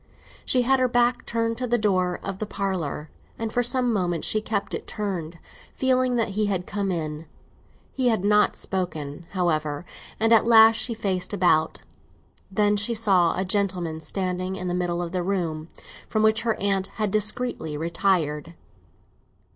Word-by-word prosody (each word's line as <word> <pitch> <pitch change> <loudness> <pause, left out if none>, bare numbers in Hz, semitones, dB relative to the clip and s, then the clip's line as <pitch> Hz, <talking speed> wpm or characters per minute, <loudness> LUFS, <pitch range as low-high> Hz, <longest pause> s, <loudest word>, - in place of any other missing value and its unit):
She 250 -1 +3
had 265 +2 +3
her 255 - +3
back 245 0 +1
turned 230 0 -1
to 250 - -2
the 240 0 +2
door 185 -5 +1
of 195 -1 -5
the 215 - -3
parlour, 180 -7 -3 0.3
and 225 -1 -4
for 245 - +2
some 245 0 +1
moments 175 -5 -1
she 215 - +2
kept 210 -2 -2
it - - -4
turned, 180 -6 -4 0.4
feeling 255 -1 +2
that 230 -2 +1
he 210 +2 0
had 185 -3 -1
come 200 -2 -2
in. 155 -2 -4 0.7
He 260 -2 0
had 220 -5 +1
not 210 0 +4
spoken, 165 -4 -4
however, 155 -4 -1 0.3
and 225 +1 +4
at 225 0 +5
last 225 -1 +7
she 235 - +1
faced 190 -3 -1
about. 175 -5 +2 0.7
Then 205 +1 +2
she 220 +3 0
saw 190 -6 +3
a 190 - 0
gentleman 180 -5 -1
standing 185 +1 -3
in 185 -1 -4
the 175 - -1
middle 175 -1 -1
of 170 - -5
the 180 0 -1
room, 170 -4 -2 0.4
from 215 -1 0
which 220 0 +3
her 225 -1 0
aunt 195 -1 0
had 215 -3 0
discreetly 215 -7 -1
retired. 165 -2 0
195 Hz, 170 wpm, -25 LUFS, 175-225 Hz, 0.7 s, last